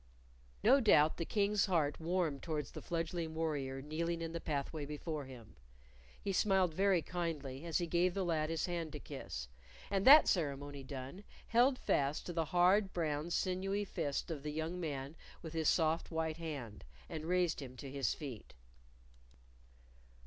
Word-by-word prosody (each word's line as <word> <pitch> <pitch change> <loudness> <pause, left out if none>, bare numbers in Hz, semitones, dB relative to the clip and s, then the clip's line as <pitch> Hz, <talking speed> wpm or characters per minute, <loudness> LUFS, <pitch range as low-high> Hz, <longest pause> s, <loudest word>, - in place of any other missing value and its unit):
No 260 +6 +7
doubt 160 - +5
the 165 - -2
King's 205 +1 +2
heart 160 -6 +1
warmed 165 -4 0
towards 150 -4 -3
the - - -8
fledgling 165 -1 -3
warrior 140 -5 -2
kneeling 165 +3 -2
in 165 - -4
the 170 0 -4
pathway 145 +1 -3
before 150 0 -4
him. 125 -4 -12 0.6
He 195 - -2
smiled 190 -3 +3
very 190 -1 +3
kindly 155 -5 -4
as 165 - +1
he 175 - 0
gave 175 +1 +1
the 195 -2 0
lad 155 -2 0
his 165 -1 0
hand 170 -3 -3
to - - -5
kiss, - - -6 0.4
and 195 -1 +1
that 300 +3 +10
ceremony 145 -4 -1
done, 135 +7 -7 0.3
held 250 +3 +4
fast 140 - 0
to 175 - -4
the 165 -1 0
hard, 185 +4 +3
brown, 155 -1 -1
sinewy 195 +3 0
fist 160 -4 -3
of 150 -4 -4
the 150 +1 -4
young 160 +4 -3
man 145 -3 -4 0.3
with 160 -1 -7
his 160 -2 +2
soft 160 -1 +2
white 160 -1 -2
hand, 140 -10 -6 0.2
and 155 0 -5
raised 175 -2 +1
him 130 -2 -9
to 135 +2 -7
his 135 -5 0
feet. 130 - -8
160 Hz, 165 wpm, -35 LUFS, 145-180 Hz, 0.6 s, that